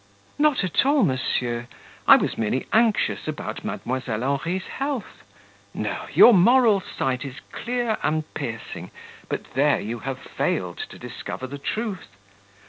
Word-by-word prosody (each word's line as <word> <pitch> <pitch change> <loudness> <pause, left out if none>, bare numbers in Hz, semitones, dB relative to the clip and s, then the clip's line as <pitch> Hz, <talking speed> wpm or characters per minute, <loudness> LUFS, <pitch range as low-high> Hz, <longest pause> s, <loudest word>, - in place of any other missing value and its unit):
"Not 295 -7 +3
at 185 - +2
all, 280 0 +4
monsieur, 125 -5 -1 0.4
I - - +11
was - - 0
merely 115 +4 -1
anxious 225 -1 +2
about - - -4
Mdlle. 130 +1 -3 0.2
Henri's 140 +9 -1
health; 275 -4 -4 0.5
no, - - -3
your 240 - +8
moral 220 +1 +5
sight 130 -6 -2
is 135 -3 -7 0.2
clear 240 -2 -2
and 155 0 +1
piercing, 115 -4 -5 0.4
but - - -5
there 140 +3 +3
you 115 +3 -4
have 135 +1 -4
failed - - -2
to - - -11
discover 130 - -6
the 140 +2 -7
truth. 210 - -3
155 Hz, 135 wpm, -24 LUFS, -, 0.5 s, I